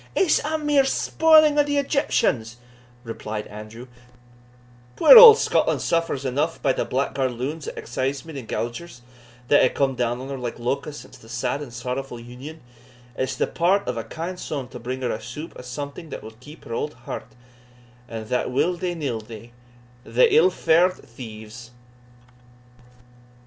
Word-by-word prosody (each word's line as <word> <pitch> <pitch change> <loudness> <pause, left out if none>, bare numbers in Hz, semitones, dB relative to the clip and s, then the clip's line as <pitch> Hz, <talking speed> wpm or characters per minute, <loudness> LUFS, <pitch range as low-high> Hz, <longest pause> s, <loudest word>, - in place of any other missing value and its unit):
"It's 365 -5 +3
a 315 +1 -1
mere 295 -2 +3
spoiling 310 +1 +4
o' - - +6
the 290 0 -1
Egyptians," 230 - 0 0.5
replied 110 -2 -6
Andrew; 110 +3 -10 1.1
"puir - - +8
auld 460 -2 +12
Scotland - - +1
suffers 165 -5 -1
eneugh 145 +6 -1
by - - +3
thae - - -1
blackguard 130 -1 -1
loons 145 +6 -5
o' - - -3
excisemen 135 +5 -4
and 130 -5 -7
gaugers, 120 +5 -5 0.5
that 145 - +6
hae 130 - +4
come 135 +1 0
down 120 -1 -1
on 130 +1 -7
her 135 -1 -5
like 120 -2 -5
locusts 135 +5 -4
since - - -16
the 115 - -17
sad 125 +4 -2
and 140 -5 -8
sorrowfu' 125 +2 -5
Union; 125 +7 -10 0.5
it's 130 +1 -2
the - - +1
part 190 +4 +1
of 125 - -2
a 115 - -4
kind 175 +6 -6
son 140 -7 -5
to 125 - -9
bring 130 +2 -5
her 125 - 0
a - - -4
soup 150 +7 -8
o' - - -9
something 140 +6 -7
that - - -7
will 110 - -9
keep 150 +5 -13
up - - -14
her - - -4
auld 150 +5 -3
heart, - - -7 0.8
and 115 -1 -6
that 125 - 0
will 165 +8 +1
they 175 0 -3
nill 135 -8 -3
they, 115 +1 -12 0.5
the 115 +3 +3
ill 175 +4 +6
fa'ard 175 0 +3
thieves!" 115 -2 -11
130 Hz, 170 wpm, -23 LUFS, 120-165 Hz, 1.1 s, auld